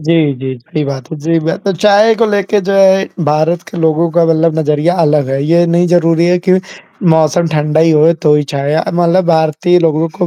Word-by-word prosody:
जी, 155 -2 +1
जी, 130 0 -6
बड़ी 150 -1 -4
बात 135 -1 -7
है। - - -5
जी, 165 +2 -1
बढ़ी 160 +1 -2
है, - - -3
तो 200 -1 -3
चाय 210 +5 +3
को 230 - +1
लेके 205 0 -1
जो - - +1
है 195 0 +3 0.2
भारत 155 +3 0
के - - -9
लोगों 160 +1 0
का 170 0 +1
मतलब 165 0 0
नज़रिया 155 +3 0
अलग 150 -4 +1
है, 135 +1 -2
ये 170 +2 +2
नहीं 170 +1 +1
ज़रूरी 170 -1 +1
है 180 0 +1
कि - - +5 0.6
मौसम 160 +2 +1
ठंडा 150 +1 0
ही 165 0 +3
हो 155 +2 +3
तो 150 -2 +3
ही 150 - +1
चाय 140 +2 -2 0.2
मतलब 175 +1 +1
भारतीय 160 +2 +1
लोगों 165 -1 0
को 180 -2 -2
165 Hz, 220 wpm, -12 LUFS, 155-175 Hz, 0.6 s, कि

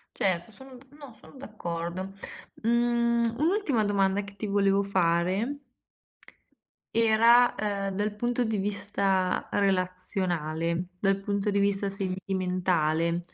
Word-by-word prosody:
Certo, 180 0 0
sono 265 +4 -12 0.2
no, 280 -5 -11
sono - - -16
d'accordo. 185 -6 -5 0.5
Mhmm, 235 0 +2
un'ultima 310 - +1
domanda 200 -1 +1
che 200 0 -11
ti 215 - -5
volevo 200 -1 +2
fare 190 +7 0 1.3
era, 230 +2 +5
uhm, 200 -2 -2
dal 205 +1 -1
punto 240 +2 0
di 220 -1 -1
vista 195 -2 0
relazionale, 180 -3 -1
dal 195 +1 +1
punto 200 +1 -1
di 200 - 0
vista 200 0 +1
sentimentale, 180 -4 -1
200 Hz, 110 wpm, -27 LUFS, 185-225 Hz, 1.3 s, era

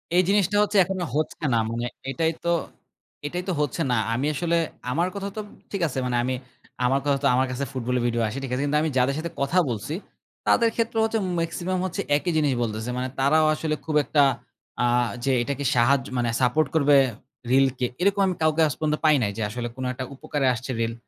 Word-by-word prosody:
এই 180 - +6
জিনিসটা 205 0 +3
হচ্ছে 210 0 0
এখনো 185 0 -3
হচ্ছে 155 +1 -2
না। - - +4
মানে 120 +1 -3 0.3
এটাই 160 +3 +1
তো - - +2 0.8
এটাই 175 +5 -3
তো - - +1
হচ্ছে 150 +3 -1
না। 125 - +2 0.2
আমি 130 +5 -1
আসলে 170 +3 0 0.3
আমার 170 +7 +1
কথা 200 0 -3
তো - - -1 0.3
ঠিক 200 -3 -3
আছে 135 -2 -3
মানে 125 -1 -1
আমি 130 +1 -1 0.5
আমার 135 +2 +3
কথা 140 -1 +2
তো - - +5
আমার 130 +1 +3
কাছে 130 +2 -3
ফুটবলের 125 -1 -1
ভিডিও 120 -1 0
আসে। 110 +5 -5
ঠিক 130 - -5
আছে। 130 - 0
কিন্তু 145 +1 +1
আমি 160 - 0
যাদের 130 +2 +2
সাথে 170 +1 -4
কথা 140 +6 +1
বলছি, 115 +5 -3 0.5
তাদের 230 -1 +4
ক্ষেত্রে 230 0 -1
হচ্ছে 225 0 +1 0.2
মেক্সিমাম 175 +3 -2
হচ্ছে 185 - -3 0.2
একই 175 +3 -2
জিনিস 150 -3 +2
বলতেছে। 110 +1 -3
মানে 130 0 -1
তারাও 155 +4 +4
আসলে 155 0 -1
খুব 155 -1 -2
একটা 145 +2 +3 0.6
আ - - +4 0.4
যে 135 - +2
এটাকে 140 +2 -3
সাহায্য 130 +2 +3
মানে 120 -1 +1
সাপোর্ট 130 +5 +3
করবে 145 -2 +5 0.5
রিলকে। 130 -1 +3 0.2
এরকম 200 +1 +3
আমি 185 - -1
কাউকে 155 0 +3
আজ 145 - -2
পর্যন্ত 150 -1 0
পাই 155 -1 +6
নাই 100 - 0
যে - - -3
আসলে 120 +2 -4
কোন 130 - -5
একটা 130 0 -5
উপকারে 145 -2 -1
আসছে 125 +3 -5
রিল। 115 0 0
145 Hz, 210 wpm, -25 LUFS, 125-165 Hz, 0.8 s, এই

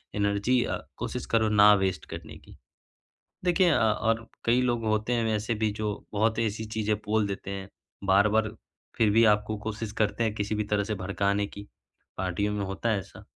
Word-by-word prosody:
Energy 100 +5 +2
अ, - - -2 0.2
कोशिश - - -4
करो 110 -1 +3
ना 105 0 +7
वेस्ट 90 -5 -2
करने - - -8
की। - - -17 0.9
देखिए 180 0 +4
अ, - - +4
और 110 +1 +1 0.2
कई 120 +2 +3
लोग 120 -2 0
होते 110 +2 0
हैं 115 -1 +1
वैसे 110 +2 -1
भी 110 - +3
जो 105 -1 -1 0.2
बहुत 110 +2 +1
ऐसी 110 -1 -1
चीज़ें 110 -1 -1
बोल 110 0 +2
देते 100 -1 -5
हैं, 100 0 -5 0.4
बार-बार 105 +3 +3 0.5
फिर 110 -2 +3
भी 115 +2 +5
आपको 105 0 +2
कोशिश 110 0 -5
करते 110 +2 +1
हैं 110 -1 -1
किसी 105 0 -2
भी 105 0 -1
तरह 105 0 0
से 110 +1 -2
भड़काने 100 +1 0
की, 100 0 -11 0.5
पार्टियों 95 +3 -1
में 100 -1 -2
होता 95 +4 -3
है 105 - +2
ऐसा, 95 - -11
105 Hz, 190 wpm, -27 LUFS, 100-110 Hz, 0.9 s, ना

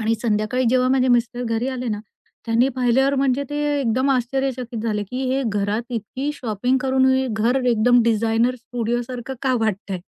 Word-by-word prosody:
आणि 225 +1 +1
संध्याकाळी 225 +3 0
जेव्हा 255 0 +3
माझे 260 0 +2
मिस्टर 245 0 +1
घरी 230 +3 -1
आले 255 -2 -3
ना, 210 -1 -2 0.5
त्यांनी 230 +3 +3
पाहिल्यावर 260 +3 +2
म्हणजे 270 0 +1
ते 290 - -3 0.2
एकदम 260 +3 +1
आश्चर्यचकित 255 -2 -1
झाले, 210 -2 -1
की 250 +6 -5
हे 270 +1 0
घरात 205 +2 -1
इतकी 255 +6 -3
शॉपिंग 245 +1 -1
करून, 265 0 +3 0.3
घर 230 +4 +1
एकदम 240 +2 +4
डिझाइनर 230 +2 +2
स्टुडिओ 240 -1 -2
सारखं 250 +2 -6
का 260 -1 +1
वाटतंय? 200 -3 -2
245 Hz, 165 wpm, -21 LUFS, 225-260 Hz, 0.5 s, एकदम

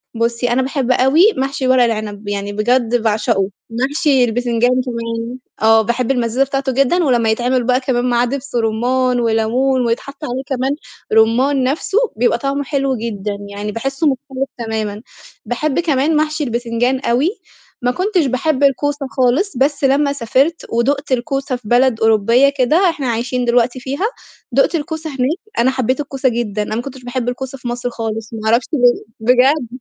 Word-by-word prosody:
بُصّي، 235 +1 0
أنا 245 +2 +2
باحب 260 -1 -1
أوي 300 - +4
محشي 270 0 -1
ورق 255 -1 +5
العنب، 215 -3 -3
يعني 205 0 -3
بجد 240 +3 +1
باعشقه، 215 -2 +1 0.2
محشي 270 +3 +1
البتنجان 240 0 +1
كمان، 235 -1 -3 0.2
آه 225 0 +5
باحب 240 +3 -1
المزازة 245 0 +1
بتاعته 275 0 -2
جدًا 275 +7 +2
ولمّا 240 -6 +2
يتعمل 245 +3 +1
بقى 250 +1 +2
كمان 250 -2 0
معاه 240 0 +2
دبس 275 +1 -5
رُمّان 245 +3 +1
وليمون، 240 +3 +1
ويتحط 275 +6 -3
عليه 260 -1 -3
كمان 265 0 -1 0.4
رُمّان 250 +5 +3
نفسُه 285 +9 -1 0.2
بيبقى 240 +2 +2
طعمه 280 +1 -2
حلو 275 -1 -1
جدًا، 210 -3 -4
يعني 205 +1 -5
باحسه 270 +8 -1
مختلف 270 0 -2
تمامًا، 220 -3 -3 0.4
باحب 270 +5 -1
كمان 305 -2 +1
محشي 310 0 0
البتنجان 240 +1 -1
أوي، 255 +5 +1 0.5
ما 245 - +2
كنتش 370 +3 0
باحب 270 +2 0
الكوسة 280 +1 +1
خالص، 260 +7 +1
بس 280 +3 +1
لمّا 280 +1 +3
سافرت 275 +6 0
ودُقت 275 +5 0
الكوسة 270 +1 -1
في 245 -4 -10
بلد 245 0 +3
أوروبية 225 +5 +4
كده، 315 +9 +3
إحنا 290 -5 -3
عايشين 245 +2 -1
دلوقتي 240 +1 +2
فيها، 275 +9 -3 0.5
دُقت 275 +7 +2
الكوسة 315 0 -4
هناك 270 +4 -1 0.2
أنا 255 +2 +3
حبيت 260 0 -1
الكوسة 270 -2 -1
جدًا، 225 -3 -2
أنا 215 - -4
ما 235 - -1
كنتش 260 0 -9
باحب 245 0 -2
الكوسة 265 +2 -5
في 250 - -8
مصر 240 0 -3
خالص، 225 -1 -5
ما 225 - -5
أعرفش 235 +2 +3
ليه 245 -4 +3 0.2
بجد 250 +4 +3
250 Hz, 165 wpm, -17 LUFS, 230-275 Hz, 0.5 s, ورق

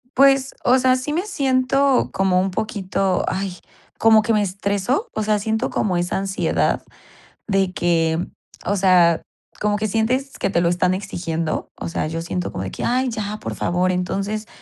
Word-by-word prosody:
Pues, 270 0 +4
o 250 +1 +5
sea, 255 0 +3
sí 255 +3 -3
me 345 +6 -1
siento 270 -5 +2
como 190 -1 +2
un 190 +1 0
poquito, 195 -2 -1
ay, 190 -1 -2 0.4
como 220 -1 +6
que 220 +2 -1
me 210 -1 +3
estresó, 200 - -1
o 215 - -1
sea, 210 0 +1
siento 220 +4 -1
como 185 -4 0
esa 175 0 -1
ansiedad 195 0 0 0.6
de 195 -3 +1
que, 165 -2 +1 0.5
o 200 +3 0
sea, 180 -3 +4 0.4
como 210 0 +1
que 215 +1 -1
sientes 250 +6 0
que - - 0
te 175 -3 +1
lo 170 - +2
están 180 +1 +2
exigiendo, 170 -4 -3
o - - -5
sea, 165 - -2
yo 165 +1 -4
siento 175 +1 -3
como 95 - -4
de 95 - -5
que, - - -4
ay, 255 +1 +1
ya, 215 -2 -4
por - - -5
favor. 180 +1 +1
Entonces, 195 +4 -2
200 Hz, 180 wpm, -21 LUFS, 180-235 Hz, 0.6 s, como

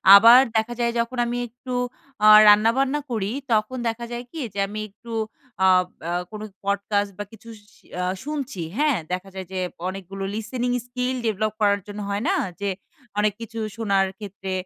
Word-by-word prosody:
আবার 230 +5 +10 0.2
দেখা 220 +2 0
যায় 235 0 +2
যখন 235 +2 -1
আমি 240 +1 -2
একটু 245 +2 -8 0.5
আ - - +8 0.2
রান্নাবান্না 230 +7 +5
করি 210 -3 -1 0.2
তখন 215 +4 +1
দেখা 235 +1 -4
যায় 240 0 -4
কি? 330 - -7
যে 200 - -4
আমি 210 +2 -6
একটু 230 +4 -13 0.5
আ - - +7 0.4
আ - - -1 0.2
কোনো 215 0 -6 0.2
পডকাস্ট 200 0 0
বা - - -1
কিছু 225 +1 -14 0.2
শি - - -25 0.4
শুনছি 275 - -4 0.2
হ্যাঁ? 295 -4 +3 0.2
দেখা 185 +2 -4
যায় 190 -1 -5
যে 190 - -2 0.3
অনেকগুলো 195 +1 -6
লিসিনিং 240 +3 -2 0.2
স্কিল 250 +1 -2
ডেভেলপ 215 0 0
করার 205 -1 +4
জন্য 205 0 -7
হয় 200 +2 -1
না? 390 - +3 0.3
যে 200 - 0 0.5
অনেক 210 0 +2
কিছু 225 0 -6 0.2
শোনার 200 -4 +2
ক্ষেত্রে 195 -2 -6
220 Hz, 170 wpm, -24 LUFS, 200-240 Hz, 0.5 s, আবার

